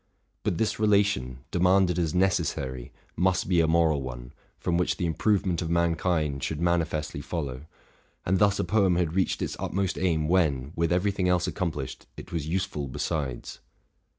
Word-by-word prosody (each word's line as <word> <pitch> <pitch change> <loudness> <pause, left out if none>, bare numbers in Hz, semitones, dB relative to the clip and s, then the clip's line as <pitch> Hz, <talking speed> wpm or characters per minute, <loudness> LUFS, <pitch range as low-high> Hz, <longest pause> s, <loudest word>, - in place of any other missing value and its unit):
But 85 - -1
this 110 - 0
relation, 100 -13 +2
demanded 90 0 +3
as 80 -3 0
necessary, 65 -9 0 0.2
must 95 +2 +1
be 90 -2 +3
a 80 - +2
moral 80 -3 +3
one, - - -7 0.2
from 85 - -1
which 90 +1 +1
the 90 - -1
improvement 90 0 +1
of 80 - -3
mankind 85 -4 +1
should 80 - -2
manifestly 80 -4 0
follow:: 70 -3 -5 0.6
and 95 +1 +2
thus 100 0 +4
a - - 0
poem 95 0 +2
had 85 -2 0
reached 95 0 0
its - - -3
utmost 95 0 -1
aim 80 -4 +1
when, 75 -7 +1
with 85 0 0
every 90 +3 +2
thing 95 -2 0
else 90 -1 +2
accomplished, 80 -8 -4
it - - -10
was 80 -3 -3
useful 80 -5 -2
besides. 65 -1 -4
85 Hz, 165 wpm, -27 LUFS, 75-90 Hz, 0.6 s, thus